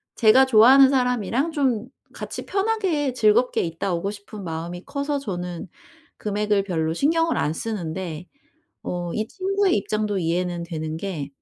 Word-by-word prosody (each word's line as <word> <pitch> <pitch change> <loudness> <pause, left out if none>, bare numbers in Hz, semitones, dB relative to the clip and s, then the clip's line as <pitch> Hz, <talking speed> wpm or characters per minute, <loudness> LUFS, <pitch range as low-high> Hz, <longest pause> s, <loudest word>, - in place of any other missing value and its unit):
제가 240 +4 +6
좋아하는 260 +3 +7
사람이랑 250 - 0
좀 255 -7 0 0.3
같이 - - -7
편하게 385 - 0
즐겁게 235 +1 +3
있다 170 +3 -2
오고 195 +4 -2
싶은 205 0 -10
마음이 170 +2 -5
커서 285 0 -2
저는 180 -8 -5 0.5
금액을 210 -1 0
별로 160 -4 -1
신경을 325 - +1
안 150 - 0
쓰는데 175 -4 -5 0.6
어 175 -1 -3
이 215 0 -2
친구의 390 0 +1
입장도 210 0 -1
이해는 175 0 -1
되는 160 -2 -5
게 165 -7 -4
210 Hz, 305 characters per minute, -23 LUFS, 175-265 Hz, 0.6 s, 좋아하는